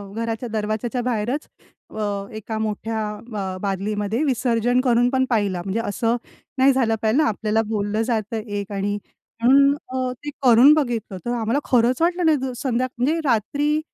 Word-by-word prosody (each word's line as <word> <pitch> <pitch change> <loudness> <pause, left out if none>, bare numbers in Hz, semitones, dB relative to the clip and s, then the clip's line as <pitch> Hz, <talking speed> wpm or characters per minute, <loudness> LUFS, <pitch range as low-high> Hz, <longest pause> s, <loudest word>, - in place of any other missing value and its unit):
घराच्या 230 +1 -3
दरवाजाच्या 220 +3 -2
बाहेरच 245 +4 -1 0.4
अ, 215 - -4 0.3
एका 220 +1 -5
मोठ्या 220 +1 -2 0.4
अ, 185 -1 -4
बादलीमध्ये 205 +5 -1
विसर्जन 245 -2 +1
करून 245 -1 +3
पण 260 0 +1
पाहिला. 200 -6 0
म्हणजे 200 +4 -1
असं 230 +2 0 0.4
नाही 265 +1 +5
झालं 230 -4 +2
पाहिजे 225 +7 +3
ना 305 - +3
आपल्याला 215 +1 0
बोललं 210 0 -1
जातं 225 -1 -1
एक 205 -1 -5
आणि 200 +1 -1 0.5
म्हणून 275 +3 +6 0.2
अ, 255 0 -2
ते 295 - -2
करून 250 +4 +7
बघितलं, 240 -10 -1
तर 240 - -1
आम्हाला 235 +3 0
खरंच 250 +3 +3
वाटलं 350 +1 +2
नाही. 315 -2 +4
द 260 -1 -3
संध्या 255 0 0
म्हणजे 290 +7 +1
रात्री 285 +6 +1
230 Hz, 160 wpm, -22 LUFS, 215-260 Hz, 0.5 s, करून